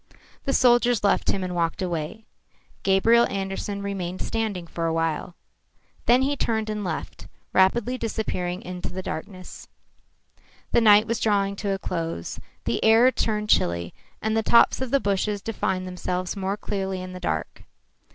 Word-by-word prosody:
The 275 - 0
soldiers 240 -3 +4
left 200 - +2
him 195 - 0
and 180 -1 -3
walked 170 -2 -1
away. 175 +3 -3 0.6
Gabriel 225 +5 +4
Andersen 195 +1 -4
remained 185 -2 -4
standing 215 -6 -2
for 165 0 -3
a - - 0
while. 165 +1 -1 0.7
Then 245 +2 +5
he 285 +2 +1
turned 220 -4 -1
and 210 -1 -3
left, 175 -4 -5 0.3
rapidly 235 +7 +3
disappearing 185 -5 -3
in 180 0 -7
the 185 +2 -5
darkness. 185 +3 -7 1.0
The - - +4
night 210 -1 +7
was 230 0 -1
drawing 200 -2 +1
to 200 - -3
a 195 - 0
close. 165 - -4 0.2
The 115 - -1
air 225 +3 +6
turned 210 -4 -1
chilly, 85 0 +1 0.3
and 220 0 0
the 225 - +3
tops 235 +3 +4
of 260 - -2
the 275 - +3
bushes 205 -1 0
defined 190 -3 -2
themselves 180 0 -3
more 195 +1 -2
clearly 195 -3 -3
in 185 0 -7
the 180 - -7
dark. 80 - -3
195 Hz, 160 wpm, -25 LUFS, 180-220 Hz, 1.0 s, night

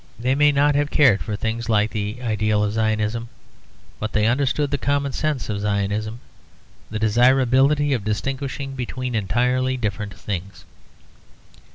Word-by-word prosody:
They 125 +2 +1
may 150 +1 +4
not 145 +1 +3
have 145 +1 +1
cared 130 -11 +4
for 105 - -3
things 115 +2 -3
like 105 -1 +2
the 105 +2 -3
ideal 105 -2 +1
of 105 0 -1
Zionism; 110 +1 -1 0.7
but 110 0 -4
they 105 0 +2
understood 140 +4 +1
the 145 - -1
common 140 +1 0
sense 155 -4 -2
of 105 -2 -3
Zionism, 105 +2 -2 0.7
the 110 - -4
desirability 130 +6 +3
of 120 -6 -1
distinguishing 135 +5 -3
between 130 0 -4
entirely 125 +5 0
different 105 -3 -3
things. 100 -1 -6
115 Hz, 145 wpm, -22 LUFS, 105-135 Hz, 0.7 s, may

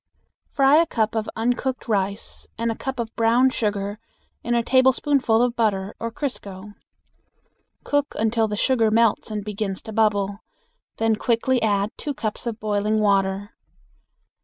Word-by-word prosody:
Fry 275 +2 +4
a 335 +1 +4
cup 220 -7 0
of 220 -1 -2
uncooked 245 +4 -1
rice 200 -1 -2
and 230 0 0
a - - -4
cup 265 +1 -5
of 230 -1 -4
brown 240 +3 +3
sugar 205 -2 -2 0.4
in 240 +1 0
a 235 - +2
tablespoonful 260 -2 +3
of 245 -1 0
butter 205 -4 0
or 230 - -3
crisco. 205 -7 -6 1.1
Cook 290 0 -1
until 220 0 +1
the 210 - -3
sugar 230 0 +2
melts 225 0 +2
and 210 -2 -4
begins 205 -2 -3
to 220 - -8
bubble; 205 -2 +1 0.6
then 225 -1 +1
quickly 240 +3 +1
add 205 -1 +1
two 290 -2 -4
cups 215 +1 -4
of 230 -1 -4
boiling 210 0 0
water. 200 0 +1
220 Hz, 150 wpm, -23 LUFS, 205-240 Hz, 1.1 s, Fry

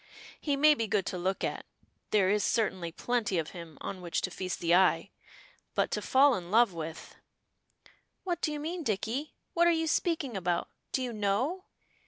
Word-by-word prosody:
He 290 -2 0
may 305 +2 +7
be 230 -6 -2
good 200 -2 +1
to 185 - -3
look 190 +2 -1
at, - - -2 0.5
there 195 -3 +3
is 210 -1 +2
certainly 190 -7 0
plenty 220 -1 -1
of 160 -2 -2
him 170 -4 -10
on 190 -2 -5
which 175 -2 -1
to 185 - -2
feast 185 +1 -4
the 170 0 +2
eye, 185 0 +4 0.6
but - - +1
to - - -1
fall 275 +1 +5
in 175 -5 -4
love 225 -1 +4
with 160 -1 -7 0.5
" - - -30
"What 350 -3 -2
do 310 - 0
you 300 - -3
mean, 335 +4 -3
Dicky? 230 - -2 0.2
What 345 0 +4
are - - +6
you 325 -1 +2
speaking 320 - 0
about 180 -2 -1 0.2
do 260 - 0
you 245 -2 -3
know? 225 - 0
210 Hz, 195 wpm, -30 LUFS, 185-290 Hz, 0.6 s, may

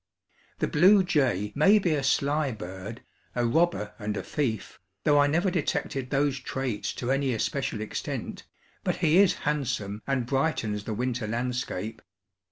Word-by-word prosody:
The - - 0
blue 190 +6 +6
jay 130 - +1
may 195 +9 +5
be 180 -6 +1
a 145 - 0
sly 140 +1 +1
bird, 95 +3 -8 0.3
a 120 -1 +1
"robber 140 -4 +1
and 105 -1 -3
a - - -3
thief," 120 -8 -3 0.2
though 145 -1 +4
I 145 - +5
never 170 +6 +1
detected 140 -5 -2
those 140 0 +1
traits 130 -4 -3
to 125 +1 -2
any 135 -2 +1
especial 125 -2 -2
extent; 110 - -5 0.4
but - - 0
he 165 +2 +4
is 200 -2 +5
handsome 115 -8 -1
and 135 -3 0
brightens 120 -7 -1
the 110 - -3
winter 125 -1 -2
landscape. 115 -2 -3
135 Hz, 155 wpm, -27 LUFS, 110-150 Hz, 0.4 s, blue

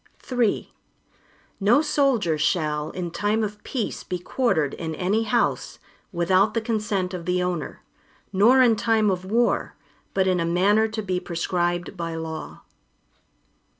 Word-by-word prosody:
III 240 -4 0 0.9
No 215 +7 +4
soldier 270 - +2
shall, 155 -1 0
in 175 -2 -5
time 210 +4 0
of 210 0 -5
peace 240 -6 -3
be 180 - -3
quartered 175 - 0
in 160 -1 -5
any 205 +7 0
house, 235 +2 0 0.3
without 185 +3 +2
the - - +3
consent 210 -5 -2
of 175 -2 -5
the 180 0 +1
owner, 175 -4 -4 0.5
nor 240 +7 +6
in 235 -3 +4
time 220 -1 +2
of 185 0 -3
war, 235 +5 +1 0.4
but 190 -1 +3
in 185 -1 +2
a - - +1
manner 195 +6 +3
to 220 0 -4
be 185 -2 -1
prescribed 175 0 -2
by 165 -2 -4
law. 160 -1 -6
190 Hz, 145 wpm, -24 LUFS, 175-220 Hz, 0.9 s, nor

